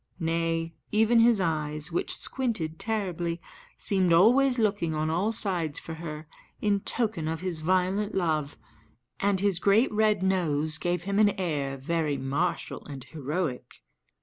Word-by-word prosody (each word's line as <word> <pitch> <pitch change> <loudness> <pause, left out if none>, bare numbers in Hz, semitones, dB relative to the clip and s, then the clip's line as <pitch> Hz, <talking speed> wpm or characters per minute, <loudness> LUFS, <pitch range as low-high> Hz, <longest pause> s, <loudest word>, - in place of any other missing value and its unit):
Nay, 165 0 -1 0.2
even 220 +2 +4
his 230 -2 +5
eyes, 155 -2 -2
which 170 - -1
squinted 200 -12 -3
terribly, 180 -6 -2 0.4
seemed 190 -3 +1
always 245 +10 +5
looking 200 -8 0
on 155 +1 0
all 190 +7 +1
sides 175 -9 -1
for 165 - -6
her, 160 -1 -7 0.3
in 205 -1 +1
token 210 -7 0
of 160 +1 -3
his 180 -4 -2
violent 185 +4 +1
love, 155 -5 -1 0.6
and 200 -1 +1
his 200 -3 +1
great 205 +7 +3
red 215 -2 +2
nose 160 -5 +1
gave 175 -1 -1
him 200 +1 0
an 205 -2 +3
air 145 -6 -2
very 150 +1 -1
martial 145 +6 -2
and 140 -3 -7
heroic. 150 - -4
175 Hz, 145 wpm, -27 LUFS, 155-200 Hz, 0.6 s, his